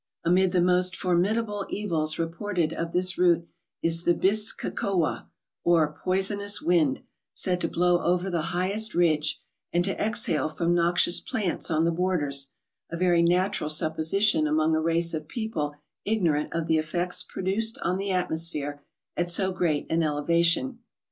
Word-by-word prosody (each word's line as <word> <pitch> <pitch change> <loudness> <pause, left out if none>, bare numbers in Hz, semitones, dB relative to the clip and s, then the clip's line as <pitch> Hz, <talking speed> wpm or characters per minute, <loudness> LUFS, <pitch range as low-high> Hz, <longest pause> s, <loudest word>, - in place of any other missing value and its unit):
Amid 180 +2 +3
the 180 -1 +2
most 180 0 +3
formidable 205 +4 0
evils 160 -7 0
reported 165 0 -2
of 165 0 -4
this 180 +1 +1
route 170 -2 +3 0.4
is 165 0 0
the 175 - +3
bis 210 +3 +1
ka - - -5
kowa, 190 -8 -1 0.3
or 160 -3 +3
poisonous 200 +2 0
wind, 165 -6 +1 0.3
said 180 -1 -1
to - - +1
blow 175 0 +2
over 180 +2 +1
the 170 -1 -1
highest 205 +4 -1
ridge, 155 -3 +2 0.3
and 175 +1 +1
to 195 - -1
exhale 165 - 0
from 170 +2 0
noxious 175 0 +2
plants 190 -5 -2
on 160 0 +2
the 170 - +2
borders—a 165 -3 -3
ver}^ 175 -1 +3
natural 180 -2 +1
sup¬ 155 +1 +1
position 160 +1 +2
among 155 +1 +2
a 160 - +1
race 165 +1 +1
of 155 -1 -4
people 165 -10 -3 0.3
ignorant 170 -9 0
of 165 -1 -2
the 160 -1 +2
effects 175 +3 -2
produced 210 +4 -1
on 180 +2 0
the 200 0 -3
atmosphere 160 -5 -2 0.3
at 175 0 -1
so 190 +2 +1
great 170 -5 0
an 165 +1 +2
elevation. 170 - +1
175 Hz, 155 wpm, -26 LUFS, 160-190 Hz, 0.4 s, Amid